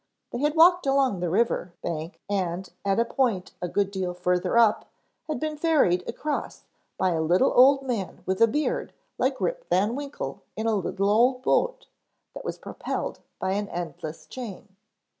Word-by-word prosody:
They 240 - -3
had 295 +3 +1
walked 350 -1 +6
along 270 -7 +2
the 175 -1 -1
river 185 -2 +1
bank 165 +1 -4
and 190 -2 -2 0.2
at 195 +1 +1
a 230 - +3
point 230 -8 0
a 180 - -1
good 200 +2 0
deal 185 -2 -3
further 180 +4 +1
up 225 -3 +4 0.4
had 310 - -2
been 310 0 -2
ferried 290 - +3
across 300 -1 -4 0.3
by 185 - +2
a 165 -2 0
little 175 +10 +3
old 270 +2 +6
man 230 -8 -4
with 190 +2 -1
a 230 - +8
beard 305 - -1 0.3
like - - +1
Rip - - -1
Van 205 +5 +2
Winkle 285 0 -5
in 220 - -3
a 225 - +2
little 195 0 0
old 250 +4 +3
boat - - +1 0.5
that - - -8
was - - -4
propelled - - -4 0.2
by 190 - -1
an 205 +1 -1
endless 170 -2 -6
chain. 205 -5 -9
210 Hz, 175 wpm, -26 LUFS, 180-270 Hz, 0.5 s, a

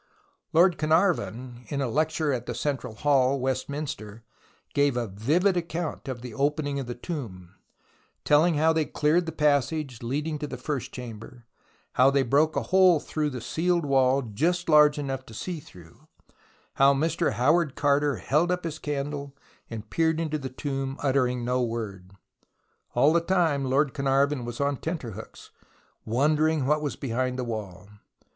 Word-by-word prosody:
Lord 175 +2 +4
Carnarvon, 155 - 0
in 140 - -3
a 135 - 0
lecture 155 +2 0
at 125 -1 -4
the - - -3
Central 130 -6 -3
Hall, 135 0 +2
Westminster, 130 -4 -4 0.5
gave 140 -3 +2
a 120 - 0
vivid 150 - +1
account 170 -3 -3
of 125 -2 -5
the 125 -3 -7
opening 145 +1 -1
of 135 - -5
the 120 - -5
tomb, 110 - -7 0.7
telling 155 +3 +4
how 160 +2 +3
they 160 -1 +1
cleared 160 +4 +1
the - - -2
passage 145 -3 0
leading 150 +6 -2
to 150 - -4
the - - -6
first 135 -3 -4
chamber, 120 0 -9 0.5
how 130 +2 +5
they 140 -1 +2
broke 145 +5 +2
a - - 0
hole 185 -3 +5
through 150 +1 -2
the 125 -4 -6
sealed 170 +4 0
wall 135 -1 +3
just 165 - -1
large 150 -2 +6
enough 135 -2 -3
to 110 - -11
see 175 +7 -4
through, 90 - -17 0.7
how 140 +1 +5
Mr. 160 -1 0
Howard 140 +6 +2
Carter 145 -1 +2
held 150 - +1
up 180 0 -1
his 160 -1 -5
candle 140 -1 -4 0.3
and 110 -2 -8
peered 160 -1 +1
into 155 -2 -2
the 135 -2 -5
tomb, 135 +1 -4
uttering 125 -3 +1
no 125 +1 +1
word. 105 -6 -4 0.8
All 140 +6 +4
the 170 - +3
time 165 -6 +1
Lord 135 +1 +1
Carnarvon 140 -1 +1
was 120 0 -6
on 140 -1 0
tenterhooks, 145 - -7 0.5
wondering 150 +4 +2
what 150 +2 +2
was 145 -2 -3
behind 130 0 -2
the 130 - -2
wall. 100 -5 -6
140 Hz, 160 wpm, -26 LUFS, 125-155 Hz, 0.8 s, large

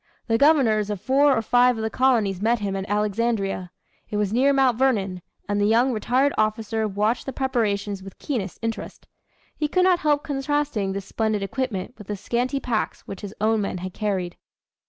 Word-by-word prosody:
The 225 -1 +1
governors 245 -9 +4
of 205 -2 -3
four 275 +4 +3
or 225 - 0
five 245 +1 +4
of 220 - -3
the 220 - -2
colonies 225 -8 +2
met 230 +3 +2
him 200 -3 -3
at 195 +1 -4
Alexandria. 205 -2 -1 0.4
It 210 - -2
was 210 -1 0
near 265 +4 +4
Mount 265 -3 +3
Vernon, 200 -9 +1 0.3
and 205 0 0
the 205 - +3
young 235 +4 +3
retired 250 +5 +1
officer 215 0 0
watched 210 +5 -1
the - - -2
preparations 210 -7 -1
with 195 0 -11
keenest 215 - -3
interest. 225 0 -5 0.5
He 300 - -1
could 365 +5 +2
not 365 -2 +4
help 295 -3 +1
contrasting 285 -8 -1
this 195 -1 -5
splendid 220 -2 -1
equipment 225 -1 -3
with 210 - -11
the 205 - -3
scanty 250 +7 -1
packs 235 -5 -2
which 195 - -9
his 205 0 -7
own 220 +1 +2
men 195 -2 -3
had 185 +1 -6
carried. 190 -5 -2
220 Hz, 190 wpm, -24 LUFS, 205-260 Hz, 0.5 s, governors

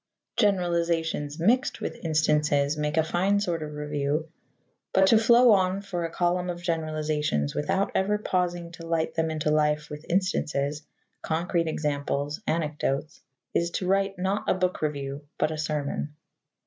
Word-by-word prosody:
Generalizations 170 -6 +1
mixed 240 +10 +2
with - - -5
instances 150 -2 +2
make 150 +1 -2
a 160 - +5
fine 190 +5 +1
sort 175 -5 -1
of 150 -1 -6
review, 150 +1 -2 0.6
but 190 - +5
to 220 +3 +6
flow 235 +2 +6
on 190 -1 +3
for 185 -4 -4
a 165 - -3
column 180 +1 0
of 175 -1 -4
generalizations 155 - -1
without 190 +7 0
ever 205 +2 +2
pausing 175 -4 -1
to 165 -1 -10
light 165 -1 0
them 160 0 0
into 155 -1 -1
life 150 0 +1
with 150 +1 -7
instances, 150 -6 0 0.4
concrete 165 +1 0
examples, 145 0 -2
anecdotes, 150 -2 -1 0.3
is 170 - +1
to 180 - -3
write 195 +1 +1
not 190 +3 -1
a - - +3
book 185 0 -1
review 140 -2 -3 0.2
but 155 - +1
a 155 - -4
sermon. 150 -1 -2
160 Hz, 150 wpm, -27 LUFS, 150-180 Hz, 0.6 s, to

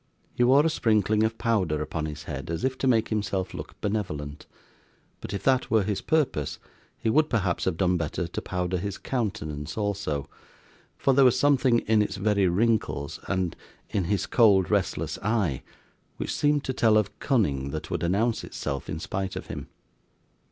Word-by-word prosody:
He 125 - +1
wore 135 +5 +5
a - - +4
sprinkling 110 -5 +2
of 110 +1 +1
powder 95 -10 +1
upon 80 +1 -3
his 75 0 -7
head, 70 -2 -6
as 85 0 -3
if 130 0 +1
to 135 - 0
make 115 -3 +3
himself 100 -4 -1
look - - -8
benevolent; 75 -9 -3 0.7
but - - -7
if 100 - -4
that 130 -1 +2
were 110 -2 +3
his 100 0 -2
purpose, 140 - 0 0.4
he - - -4
would 155 +7 +3
perhaps 95 -8 0
have 95 -3 0
done 90 -1 +2
better 85 +1 -2
to 85 - -5
powder 90 0 -2
his 100 +1 -4
countenance 75 - -3
also, 100 -9 -2 0.7
for 135 - +2
there 135 +1 +6
was 125 -1 +5
something 130 -3 +3
in 110 0 +3
its 105 - -1
very 100 -1 +2
wrinkles, 95 -7 0
and 95 -3 -1 0.4
in 95 - 0
his 100 +1 0
cold 100 -6 +4
restless - - 0
eye, 100 - 0 0.6
which - - -3
seemed 145 -1 +2
to 130 - -2
tell 110 -3 +4
of 105 -2 -1
cunning 70 - +1
that - - -5
would - - -1
announce 105 +7 +1
itself 70 - -5
in 80 - -3
spite 95 +2 -3
of - - -5
him. - - -6
100 Hz, 180 wpm, -26 LUFS, 85-115 Hz, 0.7 s, there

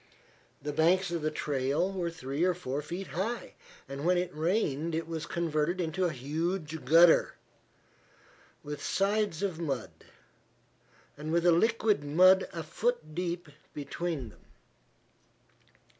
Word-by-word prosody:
The 150 0 -3
banks 175 +4 +3
of 170 -2 -2
the 155 - 0
trail 150 +4 0
were 180 -3 -2
three 155 -2 -3
or 180 -1 +3
four 145 -4 -3
feet 175 +6 -6
high, 220 +7 -3 0.3
and 140 +1 -6
when 180 +2 +3
it 180 0 -1
rained 160 -1 0
it 165 0 -2
was 165 -2 -4
converted 170 +1 -1
into 175 +2 0
a 175 - +1
huge 155 +4 -3
gutter, 165 +4 +6 1.3
with 145 0 -6
sides 200 -3 0
of 185 -5 -2
mud, 135 -8 -3 1.3
and 150 +2 -5
with 170 +1 +2
a 175 - +7
liquid 215 -1 +2
mud 185 +6 +5
a 165 -1 -5
foot 160 -1 -2
deep 175 -1 -3 0.3
between 145 -2 -4
them. - - -19
165 Hz, 135 wpm, -30 LUFS, 150-180 Hz, 1.3 s, a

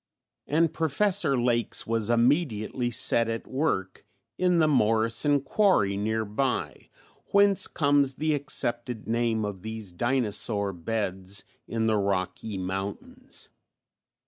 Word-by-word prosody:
And 160 +2 +2
Professor 165 -2 +1
Lakes 120 -1 0
was 115 -1 -1
immediately 120 -1 +1
set 115 0 +3
at 115 0 -3
work 130 -10 -2 0.3
in 180 -1 +2
the 160 -2 +4
"Morrison 115 +2 +2
quarry" 135 - +2
near 110 +2 -1
by, 125 +5 -2 0.4
whence 200 -1 +3
comes 140 -3 +2
the 155 +2 0
accepted 120 -5 -2
name 115 -1 0
of 100 -3 -5
these 110 -2 -6
dinosaur 105 -2 0
beds 95 +1 -3 0.2
in 115 -1 -1
the 110 -1 +2
Rocky 100 +1 -2
Mountains. 100 - -5
115 Hz, 115 wpm, -27 LUFS, 105-145 Hz, 0.4 s, the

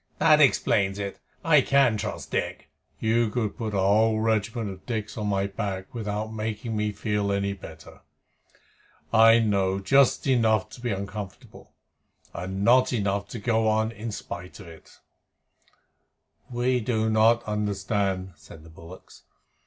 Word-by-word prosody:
"That - - +5
explains 95 0 +2
it. 100 -1 -5 0.3
I 150 -3 +6
can 135 -3 +3
trust 105 - -5
Dick." - - -3 0.3
"You 115 +1 +1
could 110 -2 -2
put 110 -4 -4
a - - +1
whole 110 +3 +3
regiment 110 0 -1
of 95 -1 -11
Dicks 110 -4 -4
on 105 -2 -3
my 100 -1 0
back 100 +1 -5
without 110 -1 -4
making 110 +1 -4
me 105 0 -1
feel 105 -1 -2
any 100 0 -1
better. 80 -5 -12 1.1
I 115 0 +7
know 100 -4 +1
just 130 +7 +3
enough 115 -6 +2
to 125 - -12
be 120 - -2
uncomfortable, 100 -1 -7 0.6
and 95 +3 -4
not 125 +3 +4
enough 100 -3 -1
to 115 - -7
go 110 0 +1
on 110 +1 +1
in 115 0 -6
spite 90 -2 -8
of 100 - -11
it." 80 -1 -14 1.6
"We 125 +1 0
do 110 -1 -1
not 110 +2 +3
understand," 100 -2 -2
said 80 0 -14
the 80 - -15
bullocks. 85 +3 -14
105 Hz, 145 wpm, -25 LUFS, 100-115 Hz, 1.6 s, I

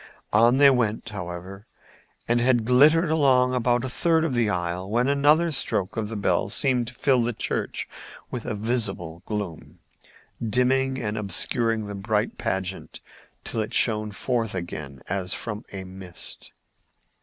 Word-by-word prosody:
On 120 +4 +5
they 140 0 +7
went, 115 -3 0
however, 95 +1 -7 0.6
and 120 0 +2
had 120 -2 +2
glittered 150 +7 +5
along 130 -5 +3
about 120 -1 +1
a - - -3
third 160 +5 +2
of 160 -5 -1
the 120 -3 +2
aisle, 90 +1 -2
when 120 +4 +1
another 150 +4 +3
stroke 100 -9 0
of 110 -2 -2
the 115 - -5
bell 95 -2 0
seemed 125 +1 +1
to 125 - -8
fill 130 0 +2
the 120 +1 -1
church - - -2 0.4
with 120 -3 -4
a 120 - -2
visible 100 -7 -2
gloom, 100 -7 -5 0.7
dimming 130 +4 +1
and 110 -2 -3
obscuring 110 +4 +1
the 105 - -6
bright 105 +2 -1
pageant 95 0 -3 0.4
till 115 - -2
it 105 - -4
shone 110 -2 +2
forth 115 0 -2
again 75 -7 -6
as 95 -1 -2
from 105 -1 -5
a 95 -1 -6
mist. 95 -1 -7
115 Hz, 155 wpm, -25 LUFS, 95-125 Hz, 0.7 s, they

